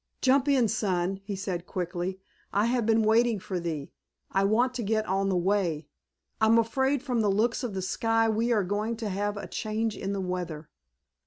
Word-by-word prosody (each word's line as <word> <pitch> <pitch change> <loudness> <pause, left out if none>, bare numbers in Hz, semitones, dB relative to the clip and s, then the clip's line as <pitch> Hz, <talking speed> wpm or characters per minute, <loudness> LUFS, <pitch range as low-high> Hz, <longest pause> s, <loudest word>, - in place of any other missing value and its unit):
"Jump 270 +1 +3
in, 265 -5 +4
son," 190 -3 0
he 200 -1 -3
said 185 -2 -4
quickly, 180 +1 -3 0.3
"I 205 +2 +2
have 235 -2 +1
been 225 0 +4
waiting 225 +1 +3
for 185 -1 -4
thee. 160 -5 -4 0.4
I 195 - +2
want 240 +5 +2
to 250 - -3
get 215 0 0
on 195 +1 0
the 185 - +1
way. 175 -5 0 0.5
I'm 220 +1 +5
afraid 265 +4 +1
from 250 -5 0
the 210 - +2
looks 225 +6 +1
of 225 -5 -3
the 190 - -2
sky 225 +4 +1
we 225 +2 +1
are 215 -4 +3
going 210 +5 -2
to 220 -2 -3
have 205 +2 -2
a - - -5
change 220 0 -2
in 195 - -4
the 200 - -2
weather." 180 -4 -4
210 Hz, 195 wpm, -28 LUFS, 190-230 Hz, 0.5 s, I'm